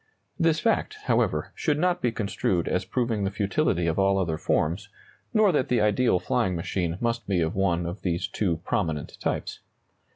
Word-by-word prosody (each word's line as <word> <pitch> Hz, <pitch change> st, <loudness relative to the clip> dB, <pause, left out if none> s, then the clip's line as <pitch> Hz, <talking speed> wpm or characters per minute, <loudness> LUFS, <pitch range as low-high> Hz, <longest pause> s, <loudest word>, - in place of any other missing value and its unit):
This 165 Hz, -1 st, +3 dB
fact, 230 Hz, -, +1 dB
however, -, -, +1 dB
should 150 Hz, -2 st, 0 dB
not 180 Hz, +2 st, +1 dB
be 120 Hz, -, +1 dB
construed 100 Hz, -5 st, -1 dB
as 90 Hz, 0 st, 0 dB
proving 115 Hz, -1 st, -1 dB
the 95 Hz, -, +1 dB
futility 100 Hz, -, 0 dB
of 85 Hz, +2 st, 0 dB
all 95 Hz, 0 st, +3 dB
other 80 Hz, -5 st, -1 dB
forms, 90 Hz, +6 st, 0 dB, 0.4 s
nor 215 Hz, -3 st, +4 dB
that 145 Hz, -6 st, +1 dB
the 125 Hz, -, +2 dB
ideal 105 Hz, 0 st, +3 dB
flying 95 Hz, 0 st, 0 dB
machine 85 Hz, 0 st, -2 dB
must 115 Hz, -2 st, -1 dB
be 95 Hz, -3 st, +1 dB
of 80 Hz, 0 st, 0 dB
one 90 Hz, -3 st, +1 dB
of 85 Hz, +4 st, -5 dB
these 85 Hz, -2 st, -1 dB
two 90 Hz, -6 st, -1 dB
prominent 80 Hz, -3 st, -2 dB
types. -, -, -3 dB
100 Hz, 175 wpm, -26 LUFS, 85-125 Hz, 0.4 s, nor